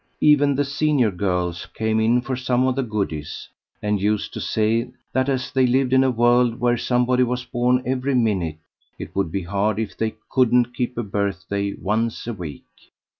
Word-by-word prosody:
Even 145 -2 +4
the 145 +1 +1
senior 140 -5 +1
girls 90 -3 -2
came 110 0 0
in 115 +3 +3
for 130 +1 -3
some 125 0 +1
of 130 -1 +1
the 135 - 0
goodies, 100 - -4 0.3
and 105 -1 0
used 105 +1 0
to - - -5
say 115 +2 0 0.2
that, 130 +2 +1
as 130 -2 -1
they 130 -1 +3
lived 130 +1 +2
in 130 0 +5
a 130 - +3
world 120 0 +3
where 120 0 +2
somebody 125 +1 +1
was 125 0 0
born 125 +1 +1
every 130 +1 0
minute, 95 -10 0 0.4
it - - -8
would 95 -4 0
be 95 +1 -2
hard 100 +4 0
if 110 -1 -3
they 110 -1 -2
couldn't 125 -1 +2
keep 125 0 -3
a 120 - -1
birthday 100 0 -2
once 110 +3 -2
a 120 - -3
week. 85 -8 -8
120 Hz, 185 wpm, -22 LUFS, 105-125 Hz, 0.4 s, in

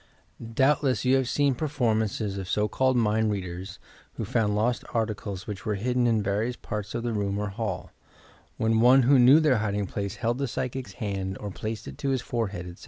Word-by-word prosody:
Doubtless 135 -4 +2
you 130 +1 +5
have 130 -2 0
seen 145 -2 +2
performances 110 -8 -1
of 95 -1 -6
so 105 0 +1
called 130 +2 +1
mind 110 -1 +2
readers 90 -2 -5 0.4
who - - -4
found 105 -2 +1
loat 120 +4 +1
articles 105 -3 -2
which 100 -3 -6
were 110 -2 -1
hidden 125 +4 +1
in 110 -3 +2
various 105 +5 -1
parts 105 -3 -5
of 120 - -2
the 120 -1 -1
room 100 -1 -1
or 105 0 -2
hall, 95 -3 -4 0.7
when 110 0 +2
one 130 +2 +6
who 135 +2 +5
knew 130 +5 +8
their 150 -6 +3
hiding 105 -1 -1
place 100 +1 -4
held 120 +2 -1
the 140 - 0
psychic's 125 -3 -4
hand 95 -3 -3
or 105 -1 -5
placed 110 +3 -5
it - - -9
to 140 -2 -1
his 130 -2 +1
forehead, 105 -7 -3
etc. 90 0 -10
110 Hz, 200 wpm, -27 LUFS, 100-125 Hz, 0.7 s, knew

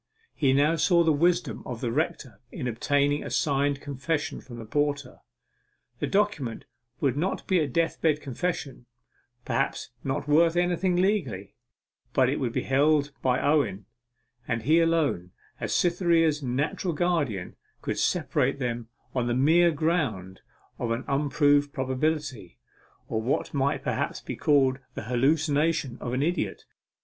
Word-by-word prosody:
He 135 -4 +2
now 145 +5 +3
saw 170 +1 +4
the 160 -1 +3
wisdom 175 +4 +1
of 120 -3 -6
the 120 -1 -2
rector 140 -6 -2
in 125 - -4
obtaining 145 +5 +1
a - - -6
signed 140 -1 +1
confession 145 +2 -3
from 120 -2 -11
the 115 - -8
porter. 145 +1 -1 0.8
The - - -1
document 195 - 0 0.3
would 135 -3 +1
not 175 +7 -2
be 185 -2 +2
a 155 - +1
death 165 +5 -1
bed 155 -2 +2
confession 140 -3 -4 0.6
perhaps - - -1
not 135 +1 -2
worth 165 +3 +4
anything 175 +1 +1
legally 175 - 0 0.6
but 130 -1 +4
it 140 - -1
would 125 -4 -1
be - - -2
held 145 +2 +2
by 125 -1 +1
Owen; 120 -10 +1 0.6
and 115 -2 -1
he 155 +6 +4
alone, 160 - +1 0.3
as - - -3
Cytherea's 170 -3 +2
natural 145 +6 -1
guardian, 145 - -1 0.3
could - - -2
separate - - +1
them 120 -3 -3 0.2
on 125 -2 0
the 120 - 0
mere 165 +7 +5
ground 140 - -1 0.4
of 120 - -2
an 115 +3 -1
unproved 145 0 +2
probability, 130 - -2 0.5
or 110 - -2
what 125 +5 -1
might 140 0 0
perhaps - - -2
be - - -6
called 135 -3 +3 0.2
the - - -5
hallucination 145 +3 +1
of 125 - -4
an 130 +2 +1
idiot. 175 +4 -2
145 Hz, 145 wpm, -27 LUFS, 125-160 Hz, 0.8 s, mere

